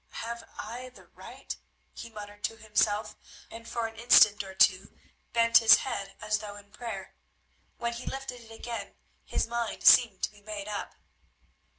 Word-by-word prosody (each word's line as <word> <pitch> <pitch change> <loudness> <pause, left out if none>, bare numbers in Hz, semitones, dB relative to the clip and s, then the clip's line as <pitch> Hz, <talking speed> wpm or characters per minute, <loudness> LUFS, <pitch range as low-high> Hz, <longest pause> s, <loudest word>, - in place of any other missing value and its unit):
"Have 235 0 -6
I 240 +4 -7
the 250 - -18
right?" - - -9 0.4
he 235 - -9
muttered 205 -1 -10
to 225 - -4
himself, 215 -1 0 0.4
and 230 0 -10
for 235 -1 -2
an 225 0 -6
instant 215 -2 +6
or 190 -1 -10
two 190 -1 +3 0.3
bent 230 0 +5
his 225 -1 +8
head 200 -7 -4
as 215 0 0
though 205 -1 -8
in 205 0 -14
prayer. 210 -4 -7 0.6
When 235 0 -2
he 235 +2 -8
lifted 270 -2 -5
it 225 -1 -15
again 230 +1 -7 0.3
his - - -1
mind 235 -1 -3
seemed 225 -6 +7
to - - 0
be 205 -1 -19
made 205 -1 -6
up. 210 -1 -5
220 Hz, 170 wpm, -29 LUFS, 205-235 Hz, 0.6 s, his